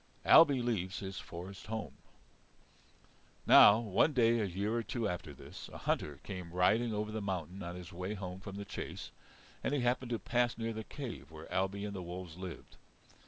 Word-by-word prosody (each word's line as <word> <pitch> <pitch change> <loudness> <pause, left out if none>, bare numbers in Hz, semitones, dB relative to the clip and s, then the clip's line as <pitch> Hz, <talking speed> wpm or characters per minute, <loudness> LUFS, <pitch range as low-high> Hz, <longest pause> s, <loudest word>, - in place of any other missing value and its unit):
Ailbe 165 -1 +9
leaves 100 -5 -1
his 95 -2 -5
Forest 90 +3 -9
Home 110 -1 -4 1.5
Now 105 - +9
one 115 +7 +2
day, 120 -2 +4
a 105 - +1
year 100 +4 -2
or 120 - +1
two 115 +1 -2
after 90 -5 -4
this, 70 - -10
a - - -8
hunter 70 -2 -1
came 90 -4 -6
riding 110 +6 +3
over 105 0 -2
the 110 0 -3
mountain 95 -1 -4
on 85 0 -5
his 90 -2 -9
way 90 +4 -4
home 95 -2 -6
from 100 0 -8
the 100 0 -5
chase, - - -6 0.5
and 145 - +1
he 140 - +1
happened 125 +1 0
to 120 - 0
pass 120 +1 0
near 115 0 -2
the 110 0 -5
cave 130 - -7
where 80 0 -10
Ailbe 95 +2 0
and 105 - -4
the 95 - -4
wolves 90 -1 -7
lived. 90 -1 -8
100 Hz, 190 wpm, -34 LUFS, 90-115 Hz, 1.5 s, Ailbe